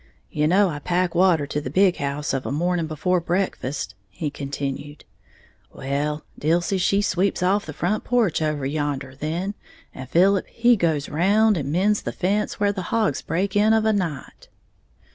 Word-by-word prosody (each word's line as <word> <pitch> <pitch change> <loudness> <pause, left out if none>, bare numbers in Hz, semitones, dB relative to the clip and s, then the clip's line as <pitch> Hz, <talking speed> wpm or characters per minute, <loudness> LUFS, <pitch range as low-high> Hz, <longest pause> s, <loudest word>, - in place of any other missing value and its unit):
"You 150 0 +1
know 195 +4 +4
I 145 -3 -4
pack 175 +3 0
water 175 -4 +3
to 150 +1 -3
the 130 - -5
big 185 +5 +3
house 140 +1 -2
of 135 -1 -2
a - - -3
morning 170 +2 0
before 180 +4 0
breakfast," 170 - -2 0.2
he 150 - -4
continued; 140 +1 -5 0.7
"well, 145 +3 -3
Dilsey 170 +5 +1
she 200 +3 +2
sweeps 185 0 0
off 195 +1 +1
the - - -4
front 180 +9 -1
porch 230 -10 +1
over 150 -3 -1
yander 145 -2 -2
then, 165 +8 -3 0.4
and 130 -1 -9
Philip 190 +4 +3
he 240 +1 +3
goes 160 -7 0
round 205 +7 +3
and 145 -4 -3
mends 200 +5 +2
the - - -4
fence 205 +4 -1
where 205 0 +2
the 195 - -4
hogs 215 - +1
breaks 190 +5 -2
in 210 +2 +4
of 220 -1 +2
a 220 - +3
night." 175 -8 -4
175 Hz, 175 wpm, -23 LUFS, 145-195 Hz, 0.7 s, know